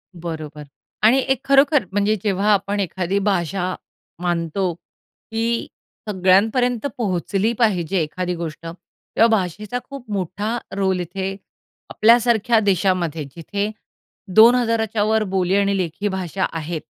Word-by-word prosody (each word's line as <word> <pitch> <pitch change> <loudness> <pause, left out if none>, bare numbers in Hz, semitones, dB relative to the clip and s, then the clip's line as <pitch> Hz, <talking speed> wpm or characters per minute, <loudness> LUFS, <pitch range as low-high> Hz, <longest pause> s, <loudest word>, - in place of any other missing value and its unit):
बरोबर. 155 -3 -7 0.4
आणि 230 +5 +6
एक 265 - +2
खरोखर 275 -2 +4
म्हणजे 205 +2 +1
जेव्हा 205 0 +1
आपण 200 +1 0
एखादी 190 +1 -1
भाषा 185 -2 -1 0.5
मानतो, 175 +1 -1
की 225 +6 -5 0.4
सगळ्यांपर्यंत 215 +6 +2
पोहोचली 200 0 0
पाहिजे 195 -6 +1
एखादी 180 +3 -3
गोष्ट, 165 -1 -6
तेव्हा 175 +6 -1
भाषेचा 205 +6 -4
खूप 275 -4 -10
मोठा 205 +4 -2 0.2
रोल 190 -2 +1
इथे, 190 +3 -4 0.5
आपल्यासारख्या 235 0 +4
देशामध्ये, 185 -5 0
जिथे 200 +5 -3 0.7
2000च्यावर 220 -2 +4
बोली 190 0 +1
आणि 200 0 +2
लेखी 185 +2 -2
भाषा 190 -1 -2
आहेत. 165 0 -4
195 Hz, 110 wpm, -21 LUFS, 175-220 Hz, 0.7 s, आणि